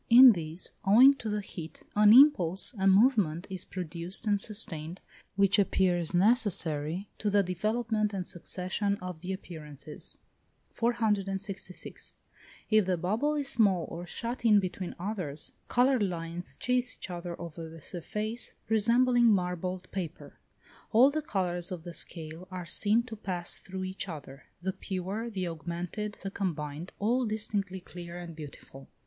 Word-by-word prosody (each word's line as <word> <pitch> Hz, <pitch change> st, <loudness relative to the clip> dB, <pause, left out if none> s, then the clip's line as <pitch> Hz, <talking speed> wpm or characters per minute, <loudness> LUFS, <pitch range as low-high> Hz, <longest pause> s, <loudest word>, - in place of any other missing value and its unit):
In 250 Hz, +2 st, +10 dB
these, 165 Hz, -2 st, -1 dB
owing 245 Hz, +8 st, +8 dB
to 220 Hz, -, -4 dB
the 210 Hz, 0 st, -1 dB
heat, 165 Hz, -4 st, -9 dB
an 210 Hz, 0 st, +7 dB
impulse, 220 Hz, -, +6 dB
a 190 Hz, -, +3 dB
movement, 195 Hz, -, +4 dB
is 185 Hz, -2 st, -3 dB
produced 175 Hz, +1 st, -4 dB
and 205 Hz, -2 st, +2 dB
sustained, 180 Hz, -6 st, -4 dB, 0.4 s
which 200 Hz, +1 st, +4 dB
appears 180 Hz, -4 st, +2 dB
necessary 180 Hz, -, +2 dB
to 210 Hz, -, 0 dB
the 205 Hz, 0 st, +4 dB
development 215 Hz, +4 st, 0 dB
and 190 Hz, -3 st, -4 dB
succession 185 Hz, +3 st, -2 dB
of 180 Hz, -3 st, -7 dB
the 185 Hz, +2 st, -4 dB
appearances. 155 Hz, -5 st, -6 dB, 0.6 s
466. 200 Hz, -5 st, -2 dB, 0.6 s
If 215 Hz, -3 st, +4 dB
the 185 Hz, -1 st, +1 dB
bubble 220 Hz, -, 0 dB
is 285 Hz, -2 st, -1 dB
small, 200 Hz, -9 st, +3 dB
or 175 Hz, +1 st, -6 dB
shut 235 Hz, +5 st, -4 dB
in 215 Hz, -3 st, +6 dB
between 185 Hz, -1 st, -4 dB
others, 175 Hz, -6 st, -4 dB
coloured 250 Hz, 0 st, +3 dB
lines 175 Hz, -2 st, -3 dB
chase 250 Hz, 0 st, +1 dB
each -, -, -7 dB
other 175 Hz, -1 st, -6 dB
over 165 Hz, -1 st, -7 dB
the 165 Hz, +1 st, -11 dB
surface, 210 Hz, +8 st, -4 dB
resembling 240 Hz, +2 st, +4 dB
marbled 180 Hz, -2 st, 0 dB
paper; 180 Hz, -5 st, -6 dB, 0.5 s
all 250 Hz, +5 st, +6 dB
the 310 Hz, +2 st, -1 dB
colours 185 Hz, -, -2 dB
of 175 Hz, -3 st, -5 dB
the 175 Hz, 0 st, -7 dB
scale 165 Hz, +2 st, -5 dB
are 185 Hz, -2 st, -6 dB
seen 210 Hz, +7 st, +3 dB
to 235 Hz, -2 st, -8 dB
pass 180 Hz, -4 st, -1 dB
through 190 Hz, 0 st, -6 dB
each 185 Hz, +1 st, -3 dB
other; 140 Hz, -4 st, -9 dB, 0.2 s
the 190 Hz, 0 st, -1 dB
pure, 195 Hz, +6 st, -4 dB
the 190 Hz, -5 st, -3 dB
augmented, 175 Hz, +5 st, -5 dB
the 195 Hz, -, -3 dB
combined, 160 Hz, -3 st, -4 dB
all 240 Hz, +5 st, +1 dB
distinctly 205 Hz, -4 st, -2 dB
clear 175 Hz, -1 st, -9 dB
and 170 Hz, -2 st, -8 dB
beautiful. 140 Hz, -3 st, -11 dB
190 Hz, 145 wpm, -30 LUFS, 175-215 Hz, 0.6 s, In